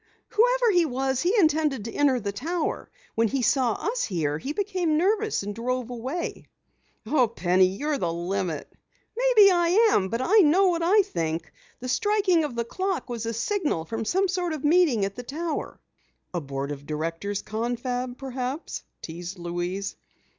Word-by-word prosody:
"Whoever -, -, +3 dB
he 355 Hz, -3 st, +4 dB
was, 265 Hz, -2 st, -1 dB
he 370 Hz, +7 st, +2 dB
intended 305 Hz, -, +2 dB
to 230 Hz, -, -5 dB
enter 275 Hz, -3 st, +3 dB
the 200 Hz, -2 st, -3 dB
tower! 315 Hz, -, -3 dB, 0.2 s
When 230 Hz, 0 st, +2 dB
he 260 Hz, +3 st, -1 dB
saw 250 Hz, -3 st, +3 dB
us 475 Hz, -, -2 dB
here, 155 Hz, -6 st, -1 dB
he 270 Hz, -, -4 dB
became 365 Hz, -3 st, 0 dB
nervous 420 Hz, -, +1 dB
and 205 Hz, +1 st, -4 dB
drove 250 Hz, +2 st, -3 dB
away!" 260 Hz, +9 st, -4 dB, 0.6 s
"Oh, 260 Hz, -6 st, +3 dB
Penny, 185 Hz, -4 st, +3 dB
you're 280 Hz, +10 st, -2 dB
the 170 Hz, -, 0 dB
limit." 175 Hz, -1 st, -3 dB, 0.5 s
"Maybe 465 Hz, -5 st, +6 dB
I 360 Hz, +6 st, +4 dB
am, 190 Hz, -, +2 dB
but 230 Hz, -, -2 dB
I 380 Hz, +12 st, +4 dB
know 370 Hz, +3 st, +5 dB
what 340 Hz, -1 st, 0 dB
I 395 Hz, +5 st, +5 dB
think. 165 Hz, -, -3 dB, 0.3 s
The 255 Hz, -, -5 dB
striking 395 Hz, -, +2 dB
of 290 Hz, -5 st, -4 dB
the 235 Hz, 0 st, -1 dB
clock 375 Hz, +1 st, -3 dB
was 230 Hz, -1 st, -4 dB
a 230 Hz, -, -1 dB
signal 290 Hz, -, -1 dB
for 225 Hz, +6 st, -3 dB
some 380 Hz, -, +1 dB
sort 355 Hz, -2 st, -1 dB
of 305 Hz, -, -5 dB
meeting 300 Hz, -, +4 dB
at 195 Hz, -, -4 dB
the 245 Hz, -, -7 dB
tower!" 310 Hz, +6 st, -4 dB, 0.5 s
"A 175 Hz, -, -1 dB
board 140 Hz, 0 st, -4 dB
of 145 Hz, 0 st, -8 dB
directors 165 Hz, +6 st, -3 dB
confab 245 Hz, +3 st, -3 dB
perhaps?" 265 Hz, +3 st, -4 dB, 0.2 s
teased 175 Hz, +3 st, -7 dB
Louise. 175 Hz, +3 st, -3 dB
255 Hz, 170 wpm, -26 LUFS, -, 0.6 s, Maybe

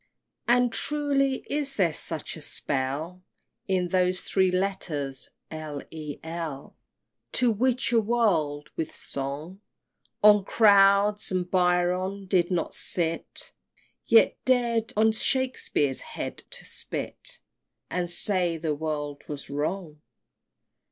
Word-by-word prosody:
XXII. 240 Hz, -, +6 dB
And, 245 Hz, -2 st, +1 dB
truly, 280 Hz, -2 st, +1 dB
is 285 Hz, -2 st, -2 dB
there 175 Hz, -6 st, +2 dB
such 160 Hz, 0 st, -3 dB
a 160 Hz, -, -10 dB
spell 145 Hz, +6 st, -3 dB, 0.5 s
In 185 Hz, -2 st, +1 dB
those 185 Hz, 0 st, +2 dB
three 190 Hz, -1 st, +2 dB
letters, 175 Hz, -8 st, 0 dB, 0.2 s
L. 155 Hz, -2 st, -6 dB
E. 155 Hz, -2 st, -6 dB
L., 160 Hz, -4 st, -6 dB, 0.6 s
To 250 Hz, -2 st, +4 dB
witch 250 Hz, +4 st, +1 dB
a 230 Hz, -1 st, +4 dB
world 170 Hz, -11 st, +1 dB
with 160 Hz, -, -4 dB
song? 145 Hz, +8 st, -4 dB, 0.6 s
On 210 Hz, -1 st, +7 dB
clouds 200 Hz, 0 st, +5 dB
the 185 Hz, -1 st, 0 dB
Byron 180 Hz, +2 st, +1 dB
did 180 Hz, -2 st, +2 dB
not 175 Hz, -3 st, -1 dB
sit, 165 Hz, -2 st, -3 dB, 0.6 s
Yet 230 Hz, -1 st, +5 dB
dar'd 235 Hz, -3 st, +2 dB
on 220 Hz, +1 st, +5 dB
Shakspeare's 220 Hz, -, 0 dB
head -, -, -6 dB
to -, -, -9 dB
spit, -, -, -5 dB, 0.5 s
And 180 Hz, -1 st, -1 dB
say 175 Hz, -2 st, +1 dB
the 160 Hz, -1 st, -1 dB
world 145 Hz, -1 st, -4 dB
was 145 Hz, -1 st, -7 dB
wrong! 150 Hz, +1 st, -3 dB
180 Hz, 120 wpm, -27 LUFS, 155-210 Hz, 0.6 s, On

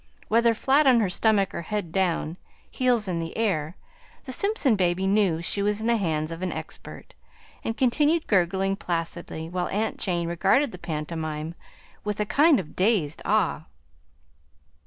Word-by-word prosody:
Whether 230 Hz, +1 st, +4 dB
flat 275 Hz, +5 st, +3 dB
on 250 Hz, -3 st, +6 dB
her 200 Hz, -5 st, 0 dB
stomach, 200 Hz, -1 st, +2 dB
or -, -, -4 dB
head 190 Hz, -1 st, -4 dB
down, 175 Hz, -3 st, 0 dB, 0.3 s
heels 245 Hz, -5 st, +1 dB
in 175 Hz, -2 st, -1 dB
the 165 Hz, 0 st, -5 dB
air, 180 Hz, -7 st, -1 dB, 0.5 s
the 260 Hz, -, -7 dB
Simpson 355 Hz, -, +1 dB
baby 185 Hz, -1 st, +1 dB
knew 190 Hz, -5 st, +2 dB
she 200 Hz, -, -1 dB
was 210 Hz, +1 st, 0 dB
in 220 Hz, -, -4 dB
the 235 Hz, 0 st, +3 dB
hands 160 Hz, -5 st, -1 dB
of 165 Hz, +1 st, -6 dB
an 185 Hz, -, -2 dB
expert, -, -, -9 dB, 0.5 s
and 225 Hz, -, -3 dB
continued 295 Hz, +5 st, +2 dB
gurgling 190 Hz, 0 st, +1 dB
placidly 165 Hz, -2 st, -4 dB
while 180 Hz, +1 st, -2 dB
aunt 215 Hz, +3 st, -2 dB
Jane 175 Hz, -3 st, -1 dB
regarded 195 Hz, -, +2 dB
the 180 Hz, -, -10 dB
pantomime 155 Hz, 0 st, -4 dB, 0.5 s
with 210 Hz, 0 st, -3 dB
a 210 Hz, -, +1 dB
kind 290 Hz, +5 st, +4 dB
of 155 Hz, -5 st, -8 dB
dazed 185 Hz, -7 st, +1 dB
awe. 195 Hz, -6 st, +1 dB
195 Hz, 160 wpm, -25 LUFS, 170-225 Hz, 0.5 s, on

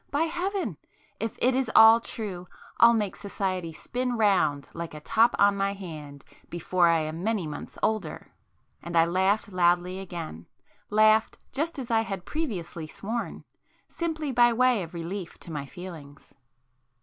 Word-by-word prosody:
By 290 Hz, +3 st, +1 dB
Heaven!—If 350 Hz, -, -4 dB
it 255 Hz, +2 st, +3 dB
is 260 Hz, -2 st, 0 dB
all 220 Hz, +1 st, +9 dB
true, 195 Hz, -6 st, -6 dB, 0.3 s
I'll 235 Hz, 0 st, +7 dB
make 210 Hz, -4 st, -1 dB
society 185 Hz, -4 st, -3 dB
spin 245 Hz, +8 st, -3 dB
round 180 Hz, -10 st, +2 dB
like 170 Hz, -2 st, -6 dB
a -, -, -7 dB
top 225 Hz, +10 st, +3 dB
on 200 Hz, 0 st, +5 dB
my 200 Hz, 0 st, 0 dB
hand 155 Hz, -7 st, -9 dB, 0.2 s
before 175 Hz, +1 st, +1 dB
I 165 Hz, -1 st, +3 dB
am 155 Hz, +3 st, -4 dB
many 215 Hz, -4 st, 0 dB
months 150 Hz, -1 st, -7 dB
older!" 220 Hz, -1 st, -2 dB, 0.5 s
And 170 Hz, 0 st, -6 dB
I 165 Hz, 0 st, +6 dB
laughed 190 Hz, +4 st, +1 dB
loudly 180 Hz, +1 st, +2 dB
again; 165 Hz, -, -7 dB, 0.4 s
laughed 215 Hz, +1 st, +4 dB
just 310 Hz, +5 st, -2 dB
as 250 Hz, -3 st, -5 dB
I 225 Hz, -1 st, +4 dB
had 195 Hz, -5 st, -5 dB
previously 175 Hz, -, -4 dB
sworn, 225 Hz, +8 st, -5 dB, 0.5 s
simply 315 Hz, -4 st, -3 dB
by 240 Hz, -1 st, +5 dB
way 250 Hz, -2 st, +3 dB
of 170 Hz, 0 st, -8 dB
relief 170 Hz, +2 st, -5 dB
to 170 Hz, -, -9 dB
my 140 Hz, -2 st, -4 dB
feelings. 160 Hz, -5 st, -11 dB
195 Hz, 150 wpm, -27 LUFS, 170-230 Hz, 0.5 s, all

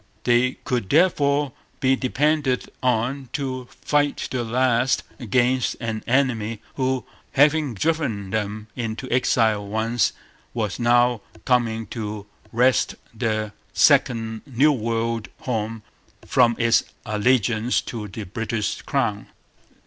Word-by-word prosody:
They 125 Hz, +1 st, +3 dB
could 125 Hz, -8 st, -1 dB
therefore 145 Hz, -4 st, +3 dB, 0.3 s
be 130 Hz, 0 st, +3 dB
depended 140 Hz, 0 st, 0 dB
on 125 Hz, +2 st, 0 dB
to 130 Hz, -3 st, -3 dB
fight 145 Hz, -1 st, 0 dB
to 130 Hz, -, -3 dB
the -, -, 0 dB
last 125 Hz, +1 st, +2 dB, 0.2 s
against 125 Hz, +1 st, +1 dB
an 110 Hz, -2 st, -3 dB
enemy 115 Hz, -4 st, +1 dB
who, 130 Hz, -1 st, -1 dB, 0.3 s
having 145 Hz, -2 st, +3 dB
driven 115 Hz, -, -1 dB
them 105 Hz, 0 st, -2 dB
into 115 Hz, +1 st, -4 dB
exile 110 Hz, -4 st, +2 dB
once, 110 Hz, 0 st, +1 dB, 0.4 s
was 110 Hz, -3 st, -2 dB
now 120 Hz, -1 st, +3 dB, 0.2 s
coming 115 Hz, -3 st, +1 dB
to 105 Hz, -3 st, -5 dB, 0.3 s
wrest 125 Hz, +2 st, +3 dB, 0.2 s
their 110 Hz, -2 st, -2 dB, 0.2 s
second 115 Hz, -2 st, +3 dB
New 140 Hz, +3 st, +4 dB
World 115 Hz, -2 st, -1 dB
home 115 Hz, -2 st, -3 dB, 0.4 s
from 120 Hz, -2 st, +4 dB
its 115 Hz, -1 st, +3 dB, 0.2 s
allegiance 115 Hz, +1 st, +2 dB
to 110 Hz, -3 st, -6 dB
the 105 Hz, +3 st, -7 dB
British 105 Hz, +1 st, -3 dB
crown. -, -, -1 dB
120 Hz, 115 wpm, -23 LUFS, 110-130 Hz, 0.4 s, New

